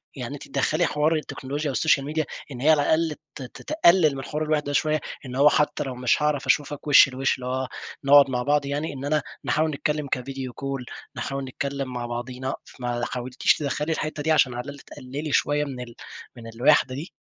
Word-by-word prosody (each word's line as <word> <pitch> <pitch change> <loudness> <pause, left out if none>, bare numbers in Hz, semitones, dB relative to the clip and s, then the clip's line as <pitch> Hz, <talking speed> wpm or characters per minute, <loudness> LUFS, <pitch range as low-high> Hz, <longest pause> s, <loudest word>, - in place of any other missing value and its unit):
يعني 125 -1 -5
أنتِ 145 - -9
تَدَخَّلي 155 +5 +1
حوار 150 +2 +1
التكنولوجيا 145 -1 -3
والسوشيال 140 +1 +2
ميديا 155 +1 -1 0.3
إن 125 -2 -7
هي 150 - +3
على 155 -2 +6
الأقل 160 +1 +1 0.2
ت - - -8
ت 125 - -11
تقلل 175 - +4
من 135 - -5
حوار 150 +3 -3
الوَحدة 150 -2 0
شوية، 155 +1 +2 0.3
إن 125 0 -6
هو 145 +2 +6
حتى 150 0 +1
لو 130 -3 -5
مش 125 +3 +1
هاعرف 150 -2 +1
أشوفكِ 145 0 0
وشّ 145 -1 +8
لوشّ 135 +1 0
اللي 125 - -8
هو 130 +1 -2 0.4
نقعُد 140 0 +7
مع 125 -1 -1
بعض 145 +1 +2
يعني 145 +3 -2
إن 135 0 -6
أنا 150 +1 +1 0.2
نحاول 155 +1 +2
نتكلم 150 0 -2
كفيديو 130 -1 -4
كول 135 -2 -4 0.3
نحاول 135 0 -3
نتكلم 135 0 -4
مع 120 -1 -3
بعضينا 125 +2 -4 0.3
ما 120 -1 -2
حاولتِيش 125 +1 +1
تَدَخَّلي 150 +2 -2
الحتة 155 -1 -3
دي 160 - +1
عشان 145 -5 +4
على 120 - -3
الأقل 140 +1 -9
تقللي 140 +4 -7
شوية 145 +1 +2
من 135 -3 -6
ال 120 -1 -8 0.4
من 115 -1 -9
الوَحدة 130 +1 +4
دي؟ 150 +7 -6
140 Hz, 200 wpm, -25 LUFS, 130-150 Hz, 0.4 s, وشّ